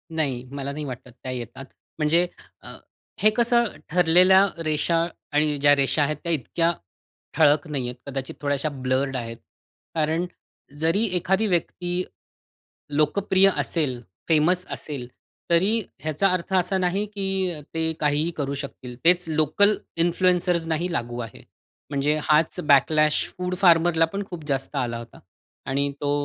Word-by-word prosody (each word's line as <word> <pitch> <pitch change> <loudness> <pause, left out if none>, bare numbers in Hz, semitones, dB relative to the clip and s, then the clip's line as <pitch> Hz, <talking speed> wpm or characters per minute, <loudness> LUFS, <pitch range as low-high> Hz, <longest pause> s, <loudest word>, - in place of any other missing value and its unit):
नाही 135 -6 -1
मला 140 0 -4
नाही 150 +1 -5
वाटत 125 -2 -8
त्या 130 - -4
येतात. 125 +1 -7 0.3
म्हणजे 165 +4 +3 0.3
अ, - - -10 0.4
हे 215 - +5
कसं 235 0 +4 0.2
ठरलेल्या 180 +3 +5 0.2
रेषा 165 +2 +1 0.3
आणि 150 0 +1
ज्या 145 +1 +5
रेषा 140 +1 +2
आहेत 150 +1 -1
त्या 170 - -2
इतक्या 165 +3 0 0.7
ठळक 150 -2 +4
नाहीयेत. 130 -5 -3
कदाचित 135 -1 -5
थोड्याश्या 145 +1 -1
ब्लर्ड 135 0 -1
आहेत. 115 -1 -6 0.6
कारण 160 +2 0 0.5
जरी 165 +8 +2
एखादी 190 +5 +1
व्यक्ती 180 0 -1 0.9
लोकप्रिय 190 +6 +3
असेल, 140 -7 -1 0.3
फेमस 170 +3 +3
असेल, 140 -5 -4 0.4
तरी 190 +7 +3 0.2
ह्याचा 155 +6 +1
अर्थ 185 +1 -3
असा 190 +1 +2
नाही 185 +3 0
की 195 -2 0 0.2
ते 160 0 0
काहीही 150 +2 +1
करू 140 -2 -2
शकतील. 135 -3 -8
तेच 180 +1 +5
लोकल 155 +7 +3 0.2
इन्फ्लुएंसर्सनाही 175 -1 +1
लागू 120 -5 -3
आहे. 115 -3 -8 0.5
म्हणजे 145 +2 +1
हाच 155 +2 +2
बॅकलॅश 150 +2 +4
फूड 180 0 -2
फार्मरला 170 -2 +5
पण 200 +1 -3
खूप 170 -4 -7
जास्त 135 -1 -2
आला 120 -1 -1
होता 115 0 -11 0.5
आणि 140 +1 0
तो 145 - -1
155 Hz, 135 wpm, -24 LUFS, 140-180 Hz, 0.9 s, हे